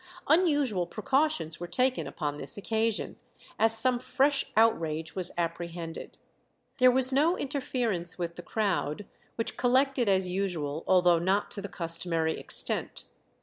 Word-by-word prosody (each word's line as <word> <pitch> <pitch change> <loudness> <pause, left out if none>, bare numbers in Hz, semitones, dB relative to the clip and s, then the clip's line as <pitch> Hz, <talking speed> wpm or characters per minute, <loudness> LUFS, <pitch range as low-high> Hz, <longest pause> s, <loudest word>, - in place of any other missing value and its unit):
Unusual 290 - +2
precautions 270 - -1
were 175 - -6
taken 255 +9 0
upon 150 -2 -4
this - - -4
occasion, 220 +1 -2 0.4
as 225 0 +6
some 250 +1 +3
fresh 275 +2 +1
outrage 160 -8 +1
was 185 -2 +1
apprehended. 170 -1 -5 0.6
There 255 0 +7
was 260 +1 +3
no 315 +6 +2
interference 240 - -1
with 170 -1 -4
the - - -8
crowd, 195 -3 -2 0.3
which 230 - -2
collected 255 -1 +2
as 190 -1 +2
usual, 175 -5 -3
although 180 -2 +4
not 190 +4 0
to 200 - -2
the 200 - -7
customary 165 -2 -1
extent. - - -1
200 Hz, 135 wpm, -28 LUFS, 170-255 Hz, 0.6 s, There